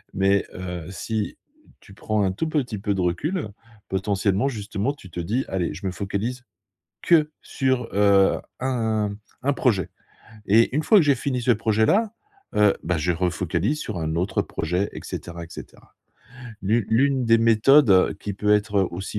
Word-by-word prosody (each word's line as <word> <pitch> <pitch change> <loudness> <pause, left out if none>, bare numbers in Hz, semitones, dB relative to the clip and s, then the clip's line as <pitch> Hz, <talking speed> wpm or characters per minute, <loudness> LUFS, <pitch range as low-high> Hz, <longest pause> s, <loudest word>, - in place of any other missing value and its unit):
mais 100 +1 +3
heu, 90 -2 -6
si 105 +2 -4 0.4
tu 100 - -17
prends 105 0 -1
un 95 - +1
tout 135 +12 -3
petit 125 -9 -2
peu 100 0 -1
de 95 - -1
recul, 105 - -1 0.4
potentiellement, 100 +3 0
justement, 110 -1 -2
tu 95 - -15
te 90 - -6
dis: 110 +10 -1
«Allez, 90 -5 -2
je 90 - -9
me 95 - -1
focalise 105 +6 -4 0.6
que 155 -3 +3
sur, 130 -3 -1
heu, 100 -1 +4 0.2
un 110 -5 -1 0.3
un 140 - +2
projet 105 - +1 0.6
et 115 +5 +4
une 155 - +2
fois 215 - +5
que 185 - +6
j'ai 145 -2 +3
fini 125 0 -2
ce 120 +1 +3
projet-là, 115 - +2 0.4
heu, 105 -1 +4
bah, 90 +1 0
je 85 +3 0
refocalise 90 - -1
sur 110 -10 -5
un 80 0 -2
autre 90 +4 0
projet 90 +5 -2
et - - -6
cetera 85 0 -7
et - - -10
cetera». - - -12 0.7
L'une 110 +3 +1
l'une 130 +2 +2
des 115 0 +4
méthodes, 115 +4 +5
heu, 95 -1 +4
qui 105 - -4
peut 105 +2 +2
être, 105 0 0
heu, 95 -2 +2
aussi 95 +4 -5
105 Hz, 175 wpm, -23 LUFS, 95-125 Hz, 0.7 s, que